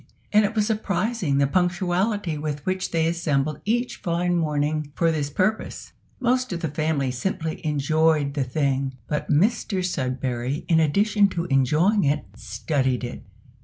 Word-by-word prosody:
And 210 +1 +6
it 215 +3 -3
was 210 -1 +2
surprising 210 -6 0
the 140 - +4
punctuality 180 +3 0
with 150 -1 -4
which 185 0 -1
they 165 -1 +1
assembled 155 -3 0
each 240 +4 0
fine 175 +1 0
morning 150 -2 0
for 165 -1 +2
this 150 -3 -1
purpose. 190 +8 -2 0.3
Most 255 -1 +1
of 170 -2 -3
the 160 - -1
family 150 -3 0
simply 160 +4 -3
enjoyed 155 -1 +2
the 140 -2 0
thing; 135 0 -1
but 150 - -3
Mr 190 +2 +1
Sudberry, 130 -3 -2
in 165 -2 +4
addition 200 +6 +3
to 170 -3 -3
enjoying 155 - +3
it, 145 -6 +1
studied 130 +1 -1
it. 120 - -6
160 Hz, 150 wpm, -24 LUFS, 140-190 Hz, 0.3 s, And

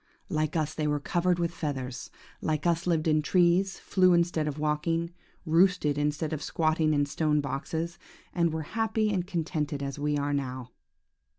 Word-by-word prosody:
Like 155 -3 -1
us 155 -1 0
they 155 -1 -1
were 150 0 +1
covered 175 +4 +1
with 170 -1 0
feathers, 130 -6 -4 0.3
like 155 0 -1
us 170 0 +1
lived 165 -2 +1
in 155 -1 +3
trees, 180 +4 +3
flew 185 -2 +3
instead 170 -3 +2
of 150 -1 -3
walking, 155 +3 0 0.3
roosted 165 -2 +3
instead 150 +2 -1
of 155 - -3
squatting 155 0 +1
in 145 0 +2
stone 150 +1 +1
boxes, 160 +5 -3 0.3
and 170 -2 +2
were 160 0 -3
happy 220 -1 +1
and 180 -2 -1
contented 155 -5 -2
as 140 +1 -4
we 150 0 0
are 145 0 -1
now! 130 -3 -3
155 Hz, 170 wpm, -28 LUFS, 150-170 Hz, 0.3 s, in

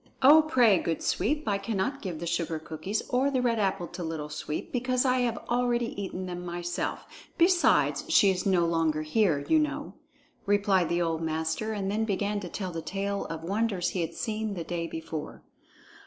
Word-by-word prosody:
"Oh, 300 +4 +9
pray, 245 - +4
good 165 - -2
Sweep! 300 -2 0
I 200 -1 +1
cannot 220 +6 -2
give 175 -5 -5
the 170 - -4
sugar 170 -1 -1
cookies 160 +6 -4
or 260 +3 +2
the 265 -2 0
red 235 -2 +1
apple 195 -3 0
to 175 0 -6
Little 160 -2 -4
Sweep, 150 0 -5
because 255 +1 0
I 255 0 +3
have 240 -2 0
already 240 -1 0
eaten 185 -1 -4
them 180 -1 -5
myself; 175 0 -3 0.3
besides, 350 +1 +3
she 200 - +6
is 180 -1 -2
no 185 -4 +3
longer 165 -2 +1
here, 155 -3 +1
you 320 - +4
know," 300 - -2 0.5
replied 200 -3 +3
the 175 0 +1
old 165 -1 -1
master, 160 +6 -2
and 200 -2 -2
then 215 +2 0
began 205 0 -1
to 185 -3 -7
tell 185 +1 -4
the 165 -1 -4
tale 195 +4 -3
of 165 -1 -6
wonders 200 0 0
he 185 - -2
had 165 0 -3
seen 220 -2 -3
the 170 - -4
day 170 0 -3
before. 160 -2 -6
195 Hz, 190 wpm, -28 LUFS, 165-225 Hz, 0.5 s, Oh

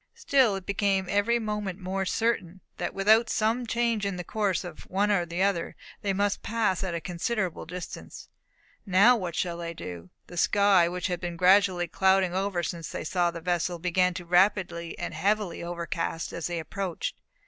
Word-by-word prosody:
Still 260 -7 +3
it 190 -1 -6
became 200 -1 +1
every 205 +4 +2
moment 210 -4 -3
more 190 +1 -2
certain 190 -5 -1 0.2
that - - -3
without 220 +4 +4
some 230 +3 0
change 230 -2 0
in 200 -1 -1
the 180 - -5
course 200 0 -1
of 175 -3 -10
one 205 +3 +1
or 175 -4 +1
the 170 +3 -1
other, 195 -4 0 0.3
they 200 - 0
must 200 +1 0
pass 215 -5 0
at 180 -3 -2
a - - -1
considerable 180 +1 -3
distance. 180 +1 -8 0.6
Now 200 +6 +6
what 180 -7 -4
should 170 -1 -1
they 170 -1 -5
do? 90 - -8 0.2
The 175 - -11
sky, 195 -1 +4
which 180 0 -4
had 180 -3 -1
been 175 -1 -5
gradually 185 -1 +4
clouding 190 0 +2
over 190 -2 -1
since 165 -1 -4
they - - -5
saw 175 +2 +1
the 170 -1 -7
vessel, 175 0 -1
began 180 +1 +1
to 175 - -6
be 170 - -22
rapidly 175 -2 +2
and 175 - -4
heavily 195 +2 0
overcast 170 -1 -3
as 165 -3 -3
they 175 -1 -3
approached. 175 +2 -4
185 Hz, 185 wpm, -27 LUFS, 175-205 Hz, 0.6 s, Now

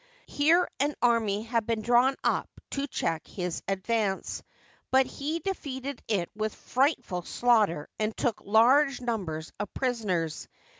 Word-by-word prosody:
Here 325 +5 +3
an 285 +2 +1
army 220 -4 +2
had 230 -1 -1
been 225 -2 -1
drawn 245 +4 +4
up - - +1 0.2
to 280 0 -2
check 165 - -2
his 180 -3 -4
advance, 195 0 -1 0.5
but 265 0 +5
he 295 +5 -3
defeated 280 -6 -4
it 195 -6 0
with 215 0 -2
frightful 255 - 0
slaughter 210 -7 +2
and 215 0 -1
took 235 -4 0
large 260 +7 +4
numbers 185 -10 -3
of 205 - -4
prisoners. 195 - -1
230 Hz, 135 wpm, -28 LUFS, 200-265 Hz, 0.5 s, but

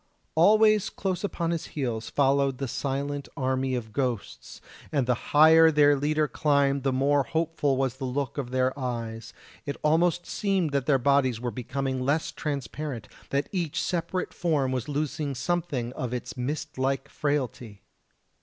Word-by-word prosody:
Always 215 +4 +5
close 190 -1 -3
upon 170 -4 -1
his 165 -2 -3
heels 120 -5 -2
followed 140 -1 +2
the 135 - -3
silent 140 +3 -3
army 130 0 0
of 110 -3 -5
ghosts, 125 -6 -3 0.3
and 140 -4 +1
the 125 - +2 0.2
higher 160 +2 +7
their 145 -2 +5
leader 150 +2 +1
climbed 140 -2 +2
the 135 0 +1
more 140 +2 +2
hopeful 155 -2 0
was 130 -1 -1
the 135 - -4
look 135 +2 -2
of 130 -3 -4
their 130 0 +1
eyes; 115 -3 -4 0.3
it 140 - -4
almost 170 +3 +2
seemed 195 -6 0
that 140 -2 -1
their 140 -3 +5
bodies 130 -2 +2
were 120 0 -3
becoming 130 +3 -3
less 145 +4 0
transparent, 140 - -4 0.2
that 140 +1 0
each 175 -6 -2
separate 175 +1 -2
form 150 -7 0
was 130 +1 -3
losing 150 0 -2
something 140 -4 -2
of 125 -2 -3
its 125 - -6
mist 145 +2 -4
like 135 +1 0
frailty. 130 -7 -3
140 Hz, 155 wpm, -27 LUFS, 130-155 Hz, 0.3 s, higher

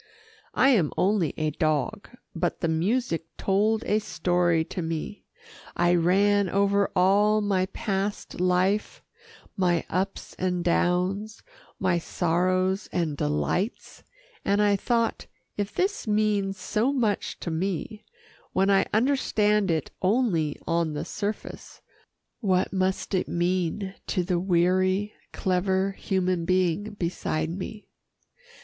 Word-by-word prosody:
I 265 - +5
am 190 - +3
only 190 -5 +2
a 155 -1 0
dog, 155 +7 -1 0.2
but 175 0 -2
the 170 - +1
music 165 +1 0
told 215 +3 +1
a 210 - +1
story 175 -4 +1
to 180 - -5
me. 165 +5 -5 0.5
I 175 0 +3
ran 195 +3 +3
over 200 +1 +2
all 205 +3 +4
my 195 -3 +1
past 200 -1 -3
life, 185 +3 +1 0.5
my 175 -3 +1
ups 190 +2 -2
and 180 -1 0
downs, 180 +5 0 0.4
my 180 -2 +2
sorrows 185 +3 0
and 165 -4 -1
delights 75 - -2 0.4
and 200 +1 +1
I 205 -1 +4
thought, 230 +3 0 0.3
if 205 0 -2
this 385 - -1
means 210 -2 +1
so 230 +7 0
much 230 -7 -1
to 170 - -3
me, 195 +5 -3 0.5
when 195 +1 +3
I 195 - +3
understand 210 -4 +2
it 160 -3 -1
only 185 - +1
on 165 -2 0
the 150 - -4
surface, 205 +1 -5 0.6
what 185 -5 +1
must 190 +1 -1
it 185 - +1
mean 180 +2 -1
to 185 - 0
the 175 -1 0
weary, 185 +3 +2 0.2
clever 190 +1 0
human 185 -3 -1
being 185 +3 0
beside 165 -3 -2
me. 200 +4 -7
190 Hz, 120 wpm, -26 LUFS, 175-205 Hz, 0.6 s, I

